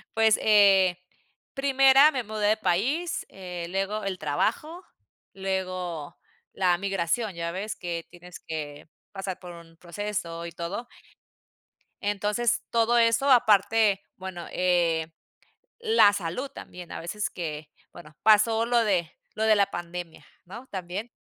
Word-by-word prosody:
Pues, 220 -1 +4
eh, 195 -4 +5 0.6
primera 270 +1 +5
me 255 -4 -2
mudé 215 -1 -2
de 215 - +3
país, 270 - -1
eh, 180 -3 -7
luego 195 +3 -2
el 190 -2 -3
trabajo, 235 - -2 0.5
luego 185 -5 -4 0.4
la 180 -2 +2
migración, 195 +2 -1
ya 170 0 -3
ves 205 +4 -4
que 170 -2 -5
tienes 175 0 -12
que 150 -1 -7 0.2
pasar 195 -2 -5
por 180 -1 -10
un 165 -1 -15
proceso 170 -2 -5
y 170 - -6
todo. 185 +9 -5 1.1
Entonces 210 +3 0
todo 235 +1 +3
eso 230 +4 +3
aparte 215 -3 +4
bueno, 185 -2 -7
eh, 170 -3 +1 0.7
la 440 - +5
salud 200 +10 -3
también 180 -1 -11
a - - -5
veces 200 +4 -3
que 155 -3 -6 0.2
bueno 150 -2 -13
pasó 220 +1 +4
lo 240 0 +3
de 180 -6 0 0.2
lo 220 - -1
de 215 -1 +5
la 200 -1 +2
pandemia, 175 -1 -7 0.2
¿no?, 230 +8 -10
también. 190 +5 -5
195 Hz, 135 wpm, -26 LUFS, 175-220 Hz, 1.1 s, eh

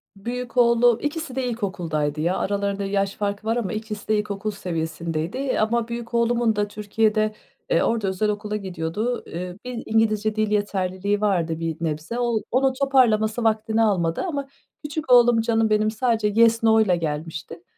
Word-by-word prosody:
Büyük 245 +4 -6
oğlum, 235 -1 +5
ikisi 295 -2 -3
de 265 - -1
ilkokuldaydı 165 -10 -2
ya. 175 +3 +1
Aralarında 200 0 -1
yaş 195 0 -1
farkı 205 +1 -3
var 225 - +2
ama 210 -6 -2
ikisi 215 -1 -6
de 215 -1 +2
ilkokul 210 0 -3
seviyesindeydi. 170 - -3
Ama 225 +2 +1
büyük 235 0 -6
oğlumun 235 -1 +2
da 205 0 0
Türkiye'de, 215 +1 0 0.4
eee, - - +3
orada 225 -4 0
özel 190 +3 0
okula 210 0 -3
gidiyordu. 190 +4 -3
Eee, 180 +1 -6
bir 245 -2 -5
İngilizce 215 -1 +1
dil 215 -1 0
yeterliliği 200 0 -1
vardı 170 -6 0
bir 165 -1 -3
nebze. 160 +9 -3
O 235 -2 +1
onun 260 +1 +3
toparlaması 240 -5 +2
vaktini 220 0 +1
almadı 175 -6 +1
ama 285 -6 -3 0.4
küçük 295 -2 -4
oğlum, 240 -2 +6
canım 225 -1 +1
benim, 215 0 +2
sadece 225 -2 +1
yes, 230 0 +4
no'yla 220 -5 +4
gelmişti. 160 +1 -5
215 Hz, 160 wpm, -23 LUFS, 190-235 Hz, 0.4 s, oğlum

